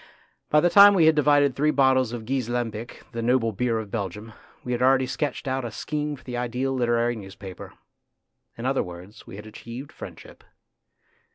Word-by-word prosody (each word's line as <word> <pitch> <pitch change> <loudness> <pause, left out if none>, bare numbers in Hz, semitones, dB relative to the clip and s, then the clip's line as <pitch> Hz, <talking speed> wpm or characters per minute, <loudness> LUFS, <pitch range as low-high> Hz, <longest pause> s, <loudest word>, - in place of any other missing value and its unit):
By 150 - +4
the 175 - +3
time 205 0 +8
we 170 -4 +5
had 160 - +6
divided 145 -2 +3
three 150 +3 +2
bottles 130 -4 +3
of 120 -2 -6
Gueze 130 -1 -2
Lambic, 120 -1 -4
the 115 - -4
noble 120 -1 +2
beer 115 +2 -1
of 110 -3 -6
Belgium, 105 +1 -5 0.3
we 125 - -5
had 120 0 -1
already 130 0 +4
sketched 145 +2 -3
out 130 0 -1
a 120 - -4
scheme 150 +6 -3
for 130 - -18
the 125 - -6
ideal 125 +2 -2
literary 120 -1 +1
newspaper. 95 -3 -10 0.8
In 115 - -6
other 135 0 +1
words, 90 +3 -10
we - - -9
had 105 +1 -10
achieved 120 +5 -9
friendship. - - -11
125 Hz, 185 wpm, -25 LUFS, 115-135 Hz, 0.8 s, time